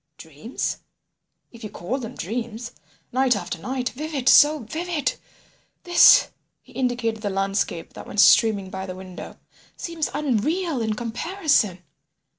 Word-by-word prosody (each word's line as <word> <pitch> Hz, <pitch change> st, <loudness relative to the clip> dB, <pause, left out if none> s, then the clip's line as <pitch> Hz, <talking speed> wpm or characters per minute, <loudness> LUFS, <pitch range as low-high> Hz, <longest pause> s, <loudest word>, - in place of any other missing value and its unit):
"Dreams?" 160 Hz, -, -5 dB, 0.7 s
"If 235 Hz, -2 st, -14 dB
you 215 Hz, -, -5 dB
call 205 Hz, +7 st, -4 dB
them 245 Hz, 0 st, -7 dB
dreams. 230 Hz, +3 st, -5 dB, 0.4 s
Night 255 Hz, -1 st, +2 dB
after 200 Hz, -, -5 dB
night. 255 Hz, +6 st, -3 dB
Vivid!—so 295 Hz, +1 st, +3 dB
vivid.... 320 Hz, +5 st, -2 dB, 0.7 s
this—" 350 Hz, 0 st, +7 dB, 0.3 s
(he -, -, -20 dB
indicated 245 Hz, -3 st, -1 dB
the 205 Hz, -, -2 dB
landscape 195 Hz, -3 st, -2 dB
that -, -, -10 dB
went 210 Hz, -, -4 dB
streaming 205 Hz, -3 st, +5 dB
by 190 Hz, 0 st, -5 dB
the 185 Hz, -, -6 dB
window) 185 Hz, -1 st, -10 dB, 0.4 s
"seems 335 Hz, -3 st, -3 dB
unreal 300 Hz, -, -1 dB
in 220 Hz, -1 st, -1 dB
comparison! 235 Hz, -, 0 dB
235 Hz, 125 wpm, -23 LUFS, 205-285 Hz, 0.7 s, this